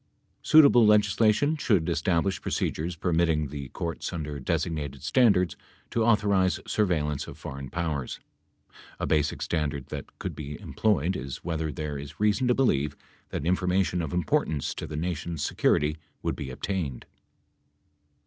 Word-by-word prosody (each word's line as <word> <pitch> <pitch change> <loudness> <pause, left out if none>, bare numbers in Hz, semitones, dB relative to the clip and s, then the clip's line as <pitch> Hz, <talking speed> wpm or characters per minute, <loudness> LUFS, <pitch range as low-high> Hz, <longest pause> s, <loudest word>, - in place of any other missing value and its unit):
Suitable 140 -6 +7
legislation 105 +7 +4
should 100 - +1
establish 85 +3 +1
procedures 85 +3 -2
permitting 80 -3 +1
the 70 -1 -6
courts 85 -1 -4
under 75 -4 -4
designated 70 0 -2
standards 90 - +3 0.4
to 115 - +1
authorize 100 -4 +3
surveillance 75 -9 0
of - - -9
foreign 70 0 -7
powers. 75 -5 -3 0.8
A - - -1
basic 75 -2 +1
standard 75 -4 -2
that - - -7
could - - -5
be 75 -1 -6
employed 95 -5 0
is 70 -3 -6
whether 80 -2 -2
there 75 0 -4
is 70 +1 -9
reason 105 +4 +2
to 125 - +3
believe 75 - +1 0.3
that 75 - -4
information 90 0 +1
of 80 -4 -4
importance 80 -3 0
to - - -6
the 75 - -5
Nation's 85 -2 -3
security 75 +2 +2 0.3
would - - -1
be 65 - -6
obtained. 70 -2 -3
80 Hz, 140 wpm, -27 LUFS, 75-95 Hz, 0.8 s, Suitable